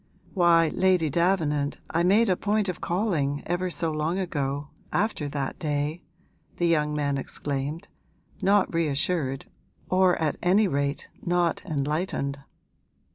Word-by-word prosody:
'Why, 170 Hz, -3 st, +4 dB
Lady 180 Hz, -5 st, +2 dB
Davenant, 155 Hz, -4 st, +1 dB
I 165 Hz, -, +1 dB
made 205 Hz, +6 st, +4 dB
a 185 Hz, -, +3 dB
point 210 Hz, +2 st, 0 dB
of 180 Hz, -, -4 dB
calling, 170 Hz, -7 st, 0 dB
ever 175 Hz, +1 st, -1 dB
so 165 Hz, -2 st, 0 dB
long 155 Hz, +3 st, -1 dB
ago 145 Hz, -6 st, -2 dB, 0.2 s
after 200 Hz, -7 st, 0 dB
that 140 Hz, -1 st, -4 dB
day!' 150 Hz, +1 st, -2 dB, 0.6 s
the 175 Hz, -, +1 dB
young 150 Hz, -3 st, +2 dB
man 140 Hz, -2 st, 0 dB
exclaimed, 140 Hz, +3 st, -4 dB, 0.5 s
not 200 Hz, -1 st, +3 dB
reassured, 150 Hz, -3 st, 0 dB, 0.5 s
or 185 Hz, -1 st, +4 dB
at 155 Hz, -3 st, 0 dB
any 195 Hz, +4 st, +4 dB
rate 140 Hz, -3 st, -1 dB, 0.2 s
not 175 Hz, -1 st, +1 dB
enlightened. 150 Hz, -2 st, -2 dB
165 Hz, 130 wpm, -26 LUFS, 145-180 Hz, 0.6 s, Why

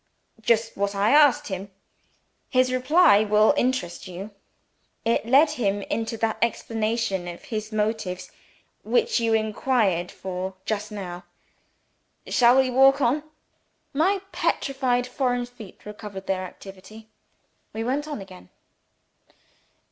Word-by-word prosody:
"Just 225 Hz, 0 st, +1 dB
what 200 Hz, 0 st, -1 dB
I 200 Hz, +2 st, +2 dB
asked 290 Hz, -5 st, +5 dB
him. 190 Hz, +1 st, -5 dB, 0.8 s
His 255 Hz, -1 st, +2 dB
reply 255 Hz, -, +5 dB
will 215 Hz, +4 st, +4 dB
interest 250 Hz, -11 st, -1 dB
you. 185 Hz, +4 st, -8 dB, 0.7 s
It 230 Hz, 0 st, +1 dB
led 285 Hz, +5 st, +5 dB
him 205 Hz, -8 st, -1 dB
into 225 Hz, +2 st, -3 dB
that 220 Hz, 0 st, -1 dB
explanation 225 Hz, -4 st, -1 dB
of 175 Hz, 0 st, -8 dB
his 215 Hz, -1 st, -5 dB
motives 210 Hz, -4 st, -2 dB, 0.5 s
which 470 Hz, -, +1 dB
you 225 Hz, -1 st, +2 dB
inquired 215 Hz, -5 st, 0 dB
for 190 Hz, 0 st, -5 dB
just 210 Hz, 0 st, -3 dB
now. 180 Hz, -4 st, -7 dB, 1.0 s
Shall 245 Hz, +1 st, +4 dB
we 265 Hz, -1 st, +3 dB
walk 270 Hz, +2 st, +5 dB
on?" 270 Hz, +3 st, +2 dB, 0.7 s
My 370 Hz, +7 st, +2 dB
petrified 270 Hz, -8 st, 0 dB
foreign 245 Hz, -1 st, -1 dB
feet 235 Hz, -5 st, -14 dB
recovered 210 Hz, -2 st, -8 dB
their 185 Hz, -1 st, -1 dB
activity. 195 Hz, +4 st, -12 dB, 0.6 s
We 225 Hz, -, -4 dB
went 275 Hz, +5 st, -1 dB
on 295 Hz, -9 st, -5 dB
again. 185 Hz, -, -13 dB
225 Hz, 120 wpm, -24 LUFS, 200-255 Hz, 1.0 s, asked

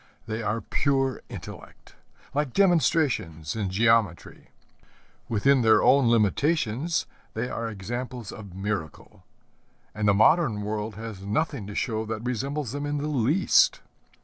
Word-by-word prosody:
They 110 Hz, 0 st, -4 dB
are 110 Hz, +1 st, -1 dB
pure 135 Hz, +4 st, 0 dB
intellect, -, -, -11 dB, 0.4 s
like 145 Hz, -3 st, -1 dB
demonstrations 145 Hz, -, +1 dB
in 105 Hz, -4 st, -2 dB
geometry. 110 Hz, -2 st, +1 dB, 0.8 s
Within 125 Hz, +5 st, +3 dB
their 110 Hz, -1 st, +5 dB
own 135 Hz, -3 st, +5 dB
limitations 130 Hz, -, +1 dB, 0.3 s
they 115 Hz, +3 st, -2 dB
are 115 Hz, -1 st, -3 dB
examples 120 Hz, +3 st, -6 dB
of 100 Hz, -5 st, -10 dB
miracle; 95 Hz, -6 st, -5 dB, 0.7 s
and 105 Hz, 0 st, -1 dB
the 100 Hz, -, +4 dB
modern 110 Hz, -, +3 dB
world 105 Hz, 0 st, -3 dB
has 110 Hz, -3 st, -7 dB
nothing 110 Hz, +2 st, -2 dB
to 105 Hz, -, -8 dB
show 110 Hz, -2 st, -1 dB
that 110 Hz, 0 st, -4 dB
resembles 135 Hz, +2 st, -2 dB
them 145 Hz, +1 st, -4 dB
in 145 Hz, 0 st, -1 dB
the 145 Hz, -, -3 dB
least. 145 Hz, -, +3 dB
115 Hz, 130 wpm, -26 LUFS, 105-140 Hz, 0.8 s, their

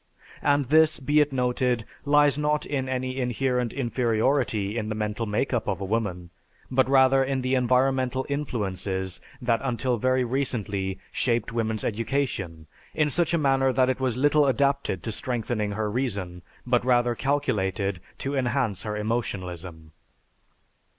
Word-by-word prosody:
And 145 Hz, -1 st, +2 dB
this, 155 Hz, +4 st, +4 dB
be 145 Hz, +2 st, +2 dB
it 150 Hz, -1 st, +3 dB
noted, 125 Hz, -2 st, 0 dB, 0.2 s
lies 145 Hz, 0 st, +4 dB
not 150 Hz, 0 st, 0 dB
in 135 Hz, -3 st, -2 dB
any 130 Hz, 0 st, -2 dB
inherent 125 Hz, -1 st, 0 dB
inferiority 120 Hz, -3 st, 0 dB
in 110 Hz, -2 st, -2 dB
the 110 Hz, -, -2 dB
mental 105 Hz, +1 st, -2 dB
make 105 Hz, +6 st, -1 dB
up 120 Hz, -, -1 dB
of -, -, -1 dB
woman, 95 Hz, -4 st, -2 dB, 0.4 s
but 130 Hz, 0 st, +3 dB
rather 135 Hz, 0 st, +5 dB
in 135 Hz, 0 st, -1 dB
the 130 Hz, +1 st, 0 dB
environmental 130 Hz, +1 st, +2 dB
influences 95 Hz, -9 st, -3 dB, 0.2 s
that 115 Hz, -2 st, +2 dB
until 125 Hz, -1 st, 0 dB
very 130 Hz, +3 st, +2 dB
recently 105 Hz, -7 st, -2 dB
shaped 120 Hz, -2 st, 0 dB
woman's 110 Hz, -2 st, -1 dB
education 110 Hz, -, -2 dB, 0.3 s
in 150 Hz, -1 st, +2 dB
such 170 Hz, +2 st, +1 dB
a -, -, +3 dB
manner 135 Hz, -3 st, +2 dB
that 130 Hz, 0 st, +2 dB
it 130 Hz, -, -4 dB
was 130 Hz, -2 st, 0 dB
little 145 Hz, +2 st, +4 dB
adapted 140 Hz, -8 st, +1 dB
to 115 Hz, -, -3 dB
strengthening 110 Hz, -2 st, -2 dB
her 110 Hz, +1 st, -1 dB
reason, 100 Hz, -7 st, -3 dB, 0.2 s
but 120 Hz, -1 st, +2 dB
rather 120 Hz, -1 st, +3 dB
calculated 105 Hz, -9 st, -1 dB, 0.2 s
to 140 Hz, +1 st, -3 dB
enhance 125 Hz, -6 st, 0 dB
her 105 Hz, -1 st, -4 dB
emotionalism. 90 Hz, -7 st, -4 dB
125 Hz, 145 wpm, -26 LUFS, 105-135 Hz, 0.4 s, rather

